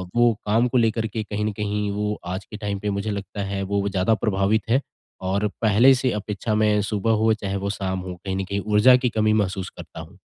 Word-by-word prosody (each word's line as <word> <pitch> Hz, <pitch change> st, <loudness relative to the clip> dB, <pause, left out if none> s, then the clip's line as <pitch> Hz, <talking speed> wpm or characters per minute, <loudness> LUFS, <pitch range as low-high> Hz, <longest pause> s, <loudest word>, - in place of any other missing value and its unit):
वो 120 Hz, -1 st, +5 dB
काम 115 Hz, +4 st, +3 dB
को 125 Hz, +1 st, 0 dB
लेकर 115 Hz, -1 st, +1 dB
के 110 Hz, +1 st, -4 dB
कहीं 105 Hz, 0 st, -3 dB
न 110 Hz, -, 0 dB
कहीं, 105 Hz, 0 st, -2 dB
वो 105 Hz, +1 st, -2 dB
आज 95 Hz, +3 st, -4 dB
के 105 Hz, -, -9 dB
टाइम 100 Hz, -2 st, -3 dB
पे 105 Hz, -, -3 dB
मुझे 100 Hz, +1 st, -2 dB
लगता 100 Hz, 0 st, -5 dB
है, 100 Hz, 0 st, -3 dB
वो 100 Hz, +1 st, -1 dB
ज़्यादा 95 Hz, +3 st, +1 dB
प्रभावित 105 Hz, 0 st, +1 dB
है। 130 Hz, +5 st, +3 dB, 0.4 s
और 100 Hz, +3 st, +1 dB
पहले 115 Hz, +5 st, +6 dB
से 130 Hz, 0 st, 0 dB
अपेक्षा 105 Hz, +1 st, -3 dB
मैं, 105 Hz, -1 st, +3 dB
सुबह 105 Hz, +1 st, -1 dB
हो 110 Hz, 0 st, +4 dB
चाहे 100 Hz, -2 st, -4 dB
वो 100 Hz, +1 st, -3 dB
शाम 95 Hz, -2 st, -2 dB
हो, 90 Hz, -1 st, -6 dB
कहीं 95 Hz, -1 st, -2 dB
न 95 Hz, -, -1 dB
कहीं 100 Hz, +1 st, -2 dB
ऊर्जा 110 Hz, +5 st, +7 dB
की 125 Hz, -1 st, +1 dB
कमी 110 Hz, -1 st, +1 dB
महसूस 95 Hz, -3 st, -1 dB
करता -, -, -10 dB
हूँ। -, -, -11 dB
105 Hz, 235 wpm, -23 LUFS, 100-110 Hz, 0.4 s, ऊर्जा